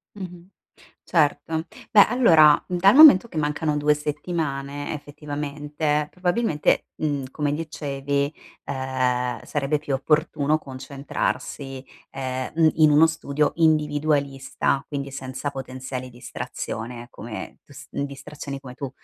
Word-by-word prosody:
Mh-mh. 180 -3 -9 0.6
Certo. 160 0 +1 0.2
Beh, 205 - +8
allora, 165 - +6
dal 185 +2 +4
momento 275 -8 +9
che 180 - -11
mancano 150 0 0
2 150 0 +3
settimane 145 -2 -3
effettivamente, 150 0 -3
probabilmente, 180 -3 +1
mhmm, 145 -3 -1
come 145 0 -1
dicevi, 145 -2 -2 0.3
ehm, 130 -2 -1
sarebbe 145 +1 -1
più 145 -1 -5
opportuno 150 +1 +1
concentrarsi, 135 0 -4 0.3
ehm, 130 -1 -4
mh, 165 -1 +5
in 155 -1 +6
uno 150 +2 +7
studio 150 -2 -1
individualista, 145 -4 +1
quindi 140 -2 -4
senza 130 +1 -5
potenziali 130 -1 -6
distrazione, 120 -1 -6
come 110 -4 -8
tu - - -18
s 155 0 -12
mh, - - -3
distrazioni 140 0 -7
come 135 -2 -10
tu, 135 +1 -5
145 Hz, 115 wpm, -24 LUFS, 135-155 Hz, 0.6 s, momento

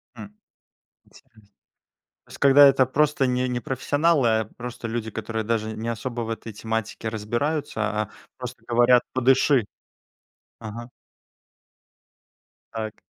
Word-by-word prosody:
М. 105 -2 -11 0.7
Интересно. 115 -5 -22 0.8
То - - -25
есть - - -10
когда 140 +1 +7
это 135 -1 +4
просто 140 +1 +2
не 125 0 0
не 120 0 -2
профессионалы, 145 +2 +1
а 110 0 +2
просто 120 -1 -6
люди, 115 -1 -3
которые 110 0 -4
даже 110 0 -1
не 115 +1 -4
особо 115 +1 -3
в 115 - -5
этой 115 0 -6
тематике 110 +1 -4
разбираются, 120 +6 -2 0.2
а 105 - -7 0.3
просто - - -8
говорят: 120 +1 +4
"Подыши". 130 -1 +3 0.9
Ага. 115 +2 -8 1.8
Так. 110 -2 -5
120 Hz, 125 wpm, -24 LUFS, 110-130 Hz, 1.8 s, когда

